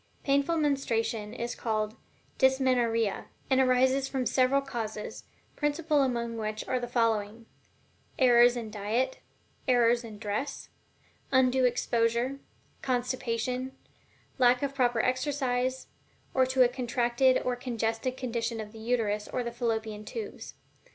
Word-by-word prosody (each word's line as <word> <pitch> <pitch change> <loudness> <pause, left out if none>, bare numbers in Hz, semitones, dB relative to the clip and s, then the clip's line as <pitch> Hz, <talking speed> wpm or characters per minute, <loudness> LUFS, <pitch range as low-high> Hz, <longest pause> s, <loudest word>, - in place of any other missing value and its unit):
Painful 280 +4 +2
menstruation 230 -7 0
is 240 +1 -4
called 215 -1 -2 0.4
"dysmenorrhea," 250 -5 +2 0.3
and 265 0 +5
arises 260 +1 +3
from 265 -2 -2
several 260 +3 +3
causes, 230 -6 -5 0.3
principal 295 0 +1
among 235 -3 -1
which 215 0 -4
are 255 - 0
the 245 - -4
following: 230 -2 0 0.7
Errors 245 -1 +6
in 225 -2 -5
diet, 225 +6 -1 0.5
errors 240 -1 +4
in 220 -2 -9
dress, 215 +6 -4 0.6
undue 260 -1 +4
exposure, 240 +2 +1 0.4
constipation, 250 0 -2 0.6
lack 250 +1 +4
of 275 -1 -1
proper 245 -4 +2
exercise, 260 -1 -1 0.5
or 260 -1 +3
to 260 0 +4
a - - +5
contracted 245 +1 +1
or 250 - 0
congested 240 0 -2
condition 235 -2 -2
of 210 -1 -6
the 225 - -12
Uterus 220 -3 -1
or 250 - -2
the 235 - -4
Fallopian 220 -3 -2
Tubes. 440 - -7
245 Hz, 125 wpm, -29 LUFS, 230-260 Hz, 0.7 s, Errors